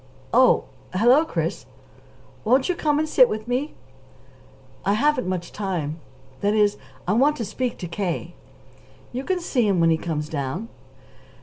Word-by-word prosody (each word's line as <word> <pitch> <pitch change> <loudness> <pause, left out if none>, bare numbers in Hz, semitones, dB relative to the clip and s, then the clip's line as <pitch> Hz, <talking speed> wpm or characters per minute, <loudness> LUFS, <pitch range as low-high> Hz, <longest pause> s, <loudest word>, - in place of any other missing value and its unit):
"Oh - - +5 0.3
hello, 245 +10 +5
Chris." - - -3 0.8
"Won't 255 +4 +3
you 365 - +1
come 300 -4 +1
and 310 +1 0
sit 255 -5 +5
with 215 +1 -4
me?" 255 +5 -2 1.1
"I 200 - +2
haven't 255 -1 +2
much 180 -2 -3
time 170 -6 -3 0.4
that 205 +1 +1
is, 210 -1 +3 0.3
I 190 - +2
want 280 +7 +4
to 230 - -3
speak 245 +4 -3
to 175 - -5
K." 175 -1 -3 0.8
"You 255 +2 -3
can 370 +4 0
see 250 -9 +1
him 195 -3 +2
when 165 0 +4
he 160 - +3
comes 155 -3 -3
down." 155 - -4
215 Hz, 160 wpm, -23 LUFS, 175-260 Hz, 1.1 s, Oh